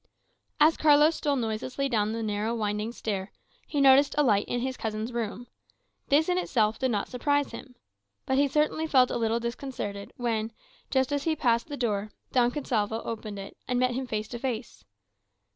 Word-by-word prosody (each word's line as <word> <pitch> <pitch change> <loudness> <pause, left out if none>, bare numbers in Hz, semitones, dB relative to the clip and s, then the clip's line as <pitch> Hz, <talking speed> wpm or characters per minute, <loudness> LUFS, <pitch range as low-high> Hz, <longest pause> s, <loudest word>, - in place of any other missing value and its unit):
As 310 +2 +5
Carlos 300 +1 +5
stole 290 -2 0
noiselessly 250 +3 -2
down 215 -4 +1
the 225 0 -3
narrow 215 +2 -1
winding 210 0 -2
stair, 200 -5 -4 0.4
he 295 - -2
noticed 275 +1 +6
a 295 - +5
light 210 -6 +2
in 245 - -1
his 260 +1 -2
cousin's 220 +1 -4
room. 235 0 -3 0.6
This 295 +3 +3
in 360 0 +2
itself 220 -10 +1
did 260 - +1
not 205 -4 -1
surprise 285 +3 0
him. 250 -2 -10 0.5
But 265 +1 +1
he 285 - +4
certainly 305 +3 +1
felt 255 -4 +4
a - - -1
little 230 0 +1
disconcerted 235 -4 -5
when, 225 -2 -1 0.4
just 265 +1 +1
as 285 -1 -1
he 320 -1 +2
passed 235 -5 +1
the 290 -2 -6
door, 215 -4 -1 0.2
Don 245 -2 +4
Gonsalvo 225 -5 -1
opened 215 -2 -5
it, 195 0 -8
and 250 0 0
met 255 0 +2
him 260 +1 -3
face 215 -2 -3
to 240 - -6
face. 240 -2 -4
240 Hz, 185 wpm, -28 LUFS, 220-275 Hz, 0.6 s, noticed